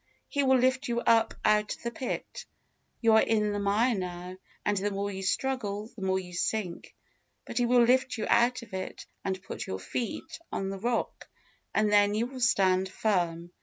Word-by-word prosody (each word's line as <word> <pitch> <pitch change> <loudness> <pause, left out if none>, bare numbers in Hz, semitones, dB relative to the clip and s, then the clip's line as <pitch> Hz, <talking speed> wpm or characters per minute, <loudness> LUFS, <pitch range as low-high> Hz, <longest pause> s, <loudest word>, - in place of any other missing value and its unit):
He 285 - 0
will 265 -1 +4
lift 260 +2 +2
you 240 0 0
up 225 -1 +3
out 210 0 +3
of - - -20
the 235 - -2
pit. 250 +2 -5 0.5
You 225 -2 +5
are 220 - +7
in 210 -2 +1
the 205 - -2
mire 210 +5 +2
now, 180 -2 -5 0.3
and 205 - +2
the 200 +1 0
more 200 0 -2
you 190 -1 -5
struggle 215 -1 -2
the 210 - -10
more 190 0 +1
you 180 -1 -6
sink; 180 0 -3 0.5
but - - -3
He 240 - +2
will 245 0 +5
lift 255 +1 +3
you 215 - -2
out 240 +1 +3
of 210 -4 -15
it, 185 0 -5 0.2
and 190 -1 -3
put - - -6
your 95 - -3
feet 245 - -4
on 195 0 -2
the 195 - -5
rock, 235 +3 -2 0.4
and 215 -1 +2
then 205 0 +4
you 225 +2 +1
will 255 +1 -8
stand 190 -5 +3
firm. 175 -5 -1
210 Hz, 200 wpm, -29 LUFS, 190-240 Hz, 0.5 s, are